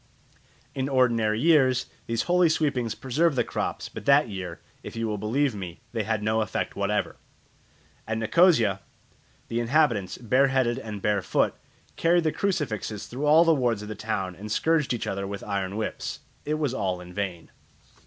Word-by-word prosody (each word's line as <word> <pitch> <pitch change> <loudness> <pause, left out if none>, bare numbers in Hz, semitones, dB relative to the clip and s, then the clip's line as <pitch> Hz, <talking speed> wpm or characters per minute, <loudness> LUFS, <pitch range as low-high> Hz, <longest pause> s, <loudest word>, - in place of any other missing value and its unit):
In 135 +1 -2
ordinary 115 -5 +2
years 130 -5 +4 0.2
these 115 0 0
holy 175 -1 +3
sweepings 135 -8 0
preserve 150 +4 +1
the - - +2
crops; - - -3
but - - -9
that 140 +1 +5
year, 95 -4 -6 0.2
if - - -9
you 115 0 -2
will 105 -1 -2
believe 125 +6 +1
me, 90 -4 -7
they 115 - -1
had 110 0 -1
no 110 +1 +1
effect 105 - -3
whatever. - - -1 0.9
At 110 0 -1
Nicosia 115 - +4 0.7
the 115 - -2
inhabitants, 120 -6 +1
bare 130 +4 +3
headed 130 -3 +1
and 105 -3 -7
bare 105 -1 +2
foot, - - +1 0.4
carried 170 +1 +3
the 155 - +1
crucifixes 135 - -2
through 135 +5 -3
all 155 +3 +7
the 165 - +5
wards 120 -7 0
of 105 - -8
the - - -3
town 95 -4 -3
and 105 +4 -8
scourged 160 +4 +2
each 120 - -2
other 100 0 -3
with 100 0 -6
iron 100 -1 -3
whips. 110 - -4 0.2
It 150 - 0
was 150 -5 -1
all 95 -6 -1
in 90 0 -11
vain. 90 -4 -4
115 Hz, 175 wpm, -26 LUFS, 105-140 Hz, 0.9 s, all